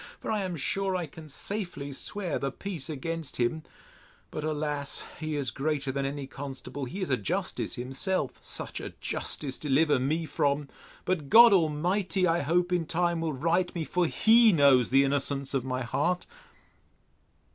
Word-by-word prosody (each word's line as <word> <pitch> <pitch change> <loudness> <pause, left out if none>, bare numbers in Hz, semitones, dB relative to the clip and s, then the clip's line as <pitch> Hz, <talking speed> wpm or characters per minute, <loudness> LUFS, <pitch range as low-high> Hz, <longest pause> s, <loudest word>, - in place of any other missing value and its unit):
for - - -4
I 215 -2 0
am 185 -2 -3
sure 190 +7 0
I 180 -2 -1
can 155 0 -12
safely 175 -3 -4
swear 185 +4 -3
the 135 0 -2
peace 165 -2 -5
against 160 +1 -4
him: 125 +6 0 0.7
But, 155 - -4
alas! 150 -2 -2 0.2
he 155 -1 -3
is 140 -5 -1
greater 140 +1 -1
than 135 0 -1
any 140 0 -4
constable: 135 0 -6
he 180 +11 -6
is 185 - -2
a 130 - +3
justice 100 -5 -2
himself: 135 +10 -2
Such - - -4
a - - -7
justice 135 -3 -3
deliver 145 0 +3
me 155 +6 0
from!—But 145 +2 -2
God 230 -1 +9
Almighty, 180 +3 +1
I 170 0 +2
hope, 175 +4 +1
in 170 -3 0
time, 170 0 0
will 160 -2 -1
right 170 +6 +1
me—For 175 +1 0
he 225 +5 +6
knows 140 - +5
the 135 +1 +5
innocence 140 0 -1
of 135 -3 0
my 130 0 -2
heart! 175 +9 0
155 Hz, 160 wpm, -28 LUFS, 140-180 Hz, 0.7 s, God